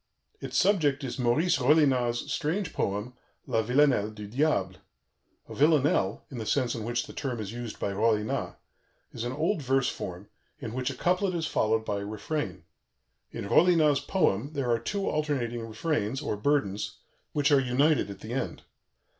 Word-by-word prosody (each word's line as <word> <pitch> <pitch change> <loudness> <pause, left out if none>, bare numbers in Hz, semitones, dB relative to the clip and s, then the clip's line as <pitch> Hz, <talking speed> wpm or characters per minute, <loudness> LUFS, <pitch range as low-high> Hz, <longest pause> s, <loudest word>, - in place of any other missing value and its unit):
Its - - -3
subject 155 -8 +3
is 130 0 -4
Maurice 140 +7 +2
Rollinat's 130 -4 +3
strange 170 +2 -1
poem, 105 +5 -2 0.3
La 115 - +1
Villanelle 125 -2 +3
du 105 -1 -9
Diable. 105 -6 0 0.7
A - - -9
"villanelle" 145 -9 +2
(in 125 - -6
the 110 - -4
sense 130 -4 +1
in 115 - -4
which 120 +2 -1
the - - -11
term 135 -5 -3
is 105 0 -5
used 120 -2 -6
by 100 - -2
Rollinat) 110 +1 0 0.6
is 115 - -5
an 120 - -2
old 160 +6 0
verse 135 0 +2
form 90 +3 -6 0.3
in 110 - -6
which 130 +1 -1
a 135 - -5
couplet 180 +5 +1
is 165 -2 -1
followed 110 -7 +1
by 100 -2 -1
a 100 - -5
refrain. 105 - -4 0.7
In 100 - -6
Rollinat's 155 - +4
poem 145 - 0
there 135 -5 -1
are 115 - +2
two 195 - -2
alternating 120 -7 -1
refrains, 115 0 -1
or 145 - -2
burdens, 105 -4 0 0.4
which 145 0 +2
are 140 - +6
united 135 +2 +2
at 100 - -9
the 110 +2 -6
end. 135 - -3
125 Hz, 170 wpm, -28 LUFS, 110-150 Hz, 0.7 s, are